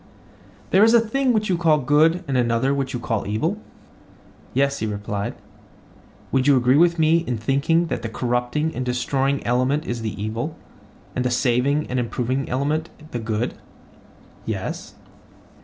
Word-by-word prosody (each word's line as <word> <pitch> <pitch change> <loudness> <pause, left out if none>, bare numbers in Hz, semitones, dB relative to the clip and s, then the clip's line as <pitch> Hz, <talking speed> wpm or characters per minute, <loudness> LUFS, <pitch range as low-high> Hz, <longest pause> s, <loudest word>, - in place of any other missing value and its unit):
There 195 - +6
is 225 +1 +6
a - - +8
thing 255 +4 +1
which 215 -2 +1
you 180 -3 0
call 160 -3 +4
good 155 +6 +3
and 135 - -1
another 120 +2 +2
which 135 -1 -2
you 125 - -3
call 115 -4 -2
evil? 160 - -1 0.9
Yes, 140 +1 +1
he 110 - -2
replied. 100 -1 -3 1.0
Would 130 +1 +2
you 140 -2 +6
agree 125 +1 +3
with 170 +2 +4
me 160 +1 +4
in 125 -8 -3
thinking 140 +8 +1
that - - -3
the 115 - -4
corrupting 125 +7 -1
and 130 - -2
destroying 135 +3 -1
element 130 +5 +1
is 120 -1 -3
the 110 -2 -4
evil, 115 +9 -3 0.6
and 125 - 0
the 125 - +1
saving 125 +4 +1
and 125 - -2
improving 125 +3 -2
element 150 +5 -1 0.2
the 120 - -3
good? 110 +1 -2 0.9
Yes. - - -5
135 Hz, 160 wpm, -22 LUFS, 120-155 Hz, 1.0 s, a